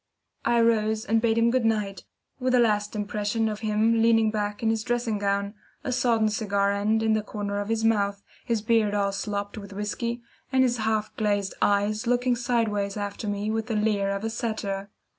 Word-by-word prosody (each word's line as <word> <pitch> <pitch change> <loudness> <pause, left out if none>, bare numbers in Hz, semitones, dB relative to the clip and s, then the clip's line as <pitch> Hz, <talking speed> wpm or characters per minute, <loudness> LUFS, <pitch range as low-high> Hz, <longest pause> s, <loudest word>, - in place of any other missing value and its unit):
I 235 - +3
rose 220 -1 +2
and 225 +2 +2
bade 225 -1 +2
him 230 0 +4
good 255 -1 +1
night, 210 -3 -1 0.3
with 255 0 +1
a - - +5
last 210 -2 +1
impression 210 +2 -1
of 215 -1 -3
him 220 +1 +2
leaning 225 -1 +4
back 210 0 -3
in 225 - +3
his 220 -1 -1
dressing 240 -3 -1
gown, 200 0 0 0.3
a 260 - -2
sodden 230 -3 +2
cigar 200 -2 0
end 215 +2 +1
in 220 0 +3
the 215 - +2
corner 205 -1 -4
of 205 +1 -4
his 225 0 0
mouth, 200 -2 +1 0.2
his 230 -4 -1
beard 220 -2 +2
all 200 -1 +1
slopped 205 +1 -4
with 200 -1 -10
whisky, 235 +4 -3 0.3
and 260 -1 +4
his 245 -1 +1
half 220 -1 -1
glazed 205 -2 0
eyes 210 +3 +1
looking 245 +1 +2
sideways 225 -4 0
after 205 +1 -4
me 205 +1 -1
with 225 0 -2
the 225 - -2
leer 210 -2 +1
of 200 +1 -2
a 225 - -2
satyr. 205 -4 -3
215 Hz, 200 wpm, -26 LUFS, 205-230 Hz, 0.3 s, a